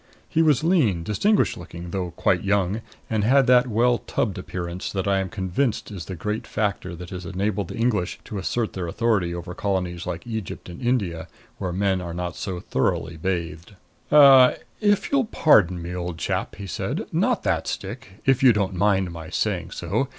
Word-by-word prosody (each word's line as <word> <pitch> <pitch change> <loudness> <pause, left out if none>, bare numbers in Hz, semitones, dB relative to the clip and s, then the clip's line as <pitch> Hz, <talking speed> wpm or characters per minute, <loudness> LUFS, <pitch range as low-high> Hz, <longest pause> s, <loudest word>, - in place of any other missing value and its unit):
He 165 - +1
was 150 -4 +3
lean, 135 - +2
distinguished 200 - +2
looking, 85 0 -8
though 90 -1 -2
quite - - 0
young, 100 +1 +1 0.3
and 110 -2 0
had 135 +4 +5
that 125 0 +5
well 120 +1 +2
tubbed 100 -6 -2
appearance 90 +1 -5
which 95 - -1
I 100 -1 +2
am 95 -1 -2
convinced 100 +7 -1
is 95 -5 -6
the 95 - -6
great 105 +6 -3
factor 100 -4 -2
that 90 +1 -9
has 90 -1 -6
enabled 95 +1 -2
the - - -7
English 110 -6 0
to 105 - -5
assert 110 +4 -1
their 90 -2 -4
authority 100 -2 +1
over 90 +1 -6
colonies 90 -3 -2
like 85 - -4
Egypt 110 -6 -5
and 85 - -9
India, 100 -10 -1 0.3
where 95 -3 -2
men 95 0 0
are 85 -1 -5
not 90 0 -4
so 95 -3 -4
thoroughly 85 -1 -1
bathed. 85 +1 -4 0.4
"Er 135 -4 +8 0.2
if 205 -2 +2
you'll 275 -3 +3
pardon 100 - +4
me, 85 +1 -6
old 90 -2 -4
chap," - - -2
he 100 - -7
said. 95 - -3
"Not - - +1
that - - 0
stick - - -6
if 135 -2 +3
you 130 -3 +7
don't 100 -2 0
mind 95 -1 +2
my 80 -2 -8
saying - - -1
so. - - -2
95 Hz, 185 wpm, -24 LUFS, 90-115 Hz, 0.4 s, Er